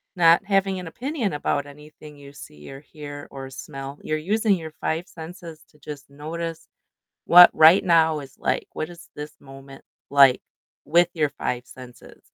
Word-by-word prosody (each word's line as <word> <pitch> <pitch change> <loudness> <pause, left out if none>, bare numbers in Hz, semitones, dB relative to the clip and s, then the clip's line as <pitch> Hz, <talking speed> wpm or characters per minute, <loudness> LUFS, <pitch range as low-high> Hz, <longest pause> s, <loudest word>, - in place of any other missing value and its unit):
not 170 -1 +5
having 195 -1 0
an 180 - -8
opinion 245 - -3
about 145 -1 -1
anything 150 +1 -14
you 140 -1 -13
see, 75 - -13
or 135 0 -10
hear, 145 -1 -10
or 135 -1 -8
smell, 135 +1 -9
you're 155 - -2
using 210 +5 +1
your 160 -3 -8
5 165 +3 -2
senses 165 -1 -11
to 150 - -26
just 145 -1 -10
notice 165 +3 -6 0.6
what 175 +1 +10
right 160 +5 +7
now 160 -3 +3
is 135 -2 -13
like, - - -1
what 155 - -5
is 170 -1 -14
this 150 +1 -7
moment 135 0 -14 0.3
like 140 -2 +6 0.4
with 170 +3 +3
your 150 -3 0
5 125 -3 -4
senses? 125 -1 -14
155 Hz, 165 wpm, -23 LUFS, 140-170 Hz, 0.6 s, what